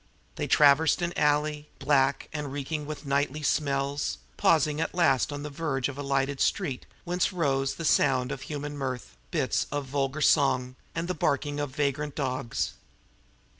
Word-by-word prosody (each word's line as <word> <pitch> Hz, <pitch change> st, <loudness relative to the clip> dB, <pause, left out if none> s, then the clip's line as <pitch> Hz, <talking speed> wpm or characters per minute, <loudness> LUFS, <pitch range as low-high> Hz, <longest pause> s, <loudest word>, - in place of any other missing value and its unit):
They -, -, -3 dB
traversed 150 Hz, +4 st, +5 dB
an 175 Hz, 0 st, -1 dB
alley, 150 Hz, 0 st, +1 dB
black 135 Hz, -2 st, +2 dB
and 150 Hz, -3 st, -4 dB
reeking 145 Hz, +2 st, -3 dB
with 155 Hz, 0 st, -6 dB
nightly 140 Hz, +2 st, 0 dB
smells, 140 Hz, -1 st, 0 dB, 0.2 s
pausing 155 Hz, -1 st, +3 dB
at 165 Hz, -, -2 dB
last 150 Hz, -7 st, +3 dB
on 145 Hz, 0 st, -5 dB
the 150 Hz, -, -5 dB
verge 140 Hz, -4 st, -1 dB
of 140 Hz, -, -6 dB
a 140 Hz, -, -5 dB
lighted 140 Hz, 0 st, 0 dB
street 140 Hz, -10 st, 0 dB, 0.2 s
whence 180 Hz, +2 st, 0 dB
rose 135 Hz, -6 st, 0 dB
the 165 Hz, -, -5 dB
sound 130 Hz, -4 st, +3 dB
of 135 Hz, -, -5 dB
human 145 Hz, 0 st, -5 dB
mirth, 130 Hz, -, -4 dB
bits -, -, 0 dB
of 145 Hz, -1 st, -2 dB
vulgar 135 Hz, +2 st, -2 dB
song, 130 Hz, -3 st, +3 dB, 0.2 s
and 165 Hz, +1 st, -2 dB
the 180 Hz, -, -1 dB
barking 145 Hz, -2 st, 0 dB
of 145 Hz, -2 st, -3 dB
vagrant 145 Hz, 0 st, -1 dB
dogs. 130 Hz, -4 st, -2 dB
145 Hz, 165 wpm, -28 LUFS, 135-150 Hz, 0.2 s, traversed